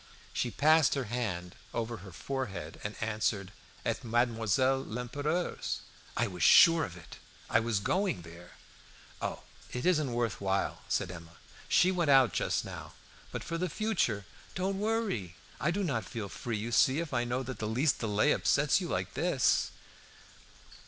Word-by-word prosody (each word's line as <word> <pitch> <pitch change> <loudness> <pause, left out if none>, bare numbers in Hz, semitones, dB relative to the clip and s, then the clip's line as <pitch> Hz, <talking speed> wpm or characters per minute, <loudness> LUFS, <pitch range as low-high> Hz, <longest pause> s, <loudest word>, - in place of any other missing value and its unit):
She 125 - 0
passed 155 +5 +4
her 135 - -1
hand 105 -7 -3 0.2
over 115 0 -2
her 95 0 -11
forehead 95 - -5
and 105 +1 -4
answered, 105 -3 -1 0.3
"At - - -1
Mademoiselle 120 +2 +2
Lempereur's." 145 +9 -2 0.4
"I 120 - +3
was 90 -5 -6
sure 165 - +8
of 90 -10 -6
it! 80 -2 -12 0.3
I 115 - +5
was 115 -2 0
going 185 - 0
there." 85 +1 -12 0.7
"Oh, - - -3 0.3
it 125 - -3
isn't 155 -7 +2
worth 115 -5 -1
while," 95 0 0
said - - 0
Emma. 85 -1 -11 0.3
"She 185 - +5
went 175 -4 0
out 135 -6 +6
just - - 0
now; - - -8 0.4
but - - -4
for 165 0 -3
the 180 0 -1
future 165 - 0 0.3
don't 190 +1 -1
worry. 205 - -1 0.2
I 150 - +1
do 200 +4 0
not 125 - -1
feel 110 -4 -5
free, 115 +2 -4
you 110 +3 -4
see, 130 +3 +4
if 165 -4 -4
I 120 -1 +2
know 125 +2 -1
that 130 -3 -6
the 110 - -2
least 130 +7 +1
delay 105 -2 +2
upsets - - +3
you - - -3
like - - -2
this." - - +2
120 Hz, 165 wpm, -31 LUFS, 105-150 Hz, 0.7 s, sure